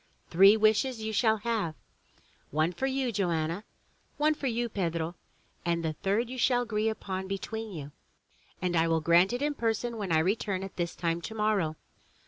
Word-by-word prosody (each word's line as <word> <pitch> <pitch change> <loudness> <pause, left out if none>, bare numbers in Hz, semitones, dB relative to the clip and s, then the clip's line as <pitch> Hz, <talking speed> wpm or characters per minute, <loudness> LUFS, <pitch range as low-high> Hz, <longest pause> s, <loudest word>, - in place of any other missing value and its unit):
Three 195 +5 +7
wishes 220 +2 +2
you 220 0 -3
shall 220 0 +3
have, 210 -7 -2 0.4
— - - -34
one 160 +3 +3
for 265 +9 -1
you, 265 -2 0
Joanna, 175 -1 -1 0.3
— - - -39
one 305 +1 +3
for 290 -2 -4
you, 240 0 0
Pedro, 170 -6 -2 0.3
— - - -37
and 170 -1 0
the 160 - 0
third 205 +8 0
you 255 +1 -6
shall 245 0 +3
agree 220 -1 0
upon 190 -3 -4
between 220 +3 -4
you 150 -5 -7 0.7
and 180 -1 0
I 165 0 +3
will 165 -1 +2
grant 170 +5 +5
it 245 +3 -2
in 295 0 +1
person 235 -2 -1
when 200 -5 -3
I 160 - +4
return 190 +2 0
at 195 - -8
this 170 -2 -2
time 170 0 -1
tomorrow.'' 210 -6 0
205 Hz, 190 wpm, -29 LUFS, 170-230 Hz, 0.7 s, Three